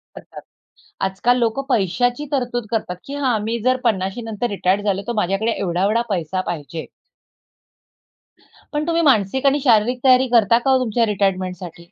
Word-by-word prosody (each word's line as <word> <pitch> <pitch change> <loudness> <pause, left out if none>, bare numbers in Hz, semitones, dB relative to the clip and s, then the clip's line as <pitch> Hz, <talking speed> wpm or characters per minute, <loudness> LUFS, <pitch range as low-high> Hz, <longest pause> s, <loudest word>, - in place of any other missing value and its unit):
करतात, - - -11 0.6
आजकाल 195 +6 +1
लोकं 235 +3 0
पैशाची 245 - 0
तरतूद 245 -4 -2
करतात 210 -6 -2
की 280 - -6
हां. 260 -5 0
मी 230 +1 -2
जर 255 0 +3
50शी 195 0 0
नंतर 225 +1 -3
रिटायर 200 0 0
झालो 200 -1 -1
तर - - 0
माझ्याकडे 205 +3 0
एवढा-एवढा 195 +5 0
पैसा 180 -1 -2
पाहिजे. 160 -1 -5 1.9
पण 300 +2 -2
तुम्ही 335 0 +1
मानसिक 265 - +2
आणि 280 +1 +3
शारीरिक 240 0 +3
तयारी 260 0 +5
करता 230 -1 +4
का 270 +2 -1
हो 265 - +5
तुमच्या 230 0 +1
रिटायरमेंटसाठी? 185 -4 -3
225 Hz, 150 wpm, -20 LUFS, 190-250 Hz, 1.9 s, तयारी